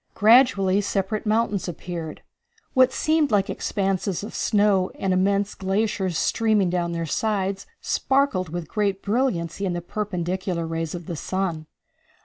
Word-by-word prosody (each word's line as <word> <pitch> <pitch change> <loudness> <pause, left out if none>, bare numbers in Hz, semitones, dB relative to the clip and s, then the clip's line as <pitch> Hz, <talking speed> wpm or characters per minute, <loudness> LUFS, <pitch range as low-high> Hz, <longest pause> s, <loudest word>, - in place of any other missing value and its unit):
Gradually 210 -4 +5
separate 200 +2 -2
mountains 215 -3 +1
appeared. 170 -2 -6 0.5
What 255 -1 +5
seemed 310 +1 +1
like 205 -3 +1
expanses 195 -1 -1
of 210 - -7
snow 200 -3 +2
and 190 -1 0
immense 200 +2 +1
glaciers 190 -2 -1
streaming 210 -2 +2
down 175 -1 -1
their 165 0 -2
sides 195 +2 -1
sparkled 265 - +1
with 170 0 -5
great 200 -1 -1
brilliancy 200 -6 -1
in 185 -2 0
the 175 - -2
perpendicular 180 -2 -3
rays 165 0 -3
of 175 -1 -7
the 170 - -5
sun. 170 -2 -3
195 Hz, 135 wpm, -24 LUFS, 175-210 Hz, 0.5 s, Gradually